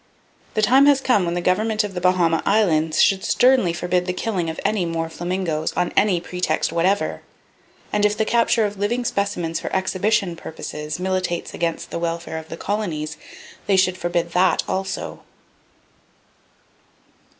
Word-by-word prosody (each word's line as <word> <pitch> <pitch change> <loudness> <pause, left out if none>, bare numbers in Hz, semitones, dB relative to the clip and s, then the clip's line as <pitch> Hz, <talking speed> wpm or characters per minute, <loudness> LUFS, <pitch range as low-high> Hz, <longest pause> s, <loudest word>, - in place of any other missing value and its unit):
The 215 - +1
time 265 +6 +6
has 285 -1 +5
come 245 -8 +2
when 170 0 -2
the 175 - -1
Government 215 +5 +1
of 205 -2 -5
the 180 - -4
Bahama 175 -3 +2
Islands 165 -7 +2
should 195 -1 +2
sternly 250 -8 +3
forbid 180 +1 -1
the 180 - 0
killing 180 -5 -2
of 160 - -5
any 210 -4 +1
more 165 -1 -2
flamingos, 175 -2 -2
on 180 0 -1
any 195 -4 +3
pretext 175 -3 -1
whatever; 185 +4 0 0.7
and 210 - +1
if 210 0 +2
the 220 - +1
capture 230 -1 +2
of 205 -1 -5
living 240 +4 -1
specimens 200 -7 -1
for - - -5
exhibition 190 0 0
purposes 155 -1 -6
militates 185 -2 -2
against 165 -1 -3
the - - -3
welfare 170 -1 -3
of 160 - -13
the 165 - -6
colonies, 165 -8 -3 0.5
they 200 - +3
should 185 -1 +3
forbid 175 -1 -2
that 180 +2 +3
also. 190 0 -4
185 Hz, 160 wpm, -22 LUFS, 170-205 Hz, 0.7 s, time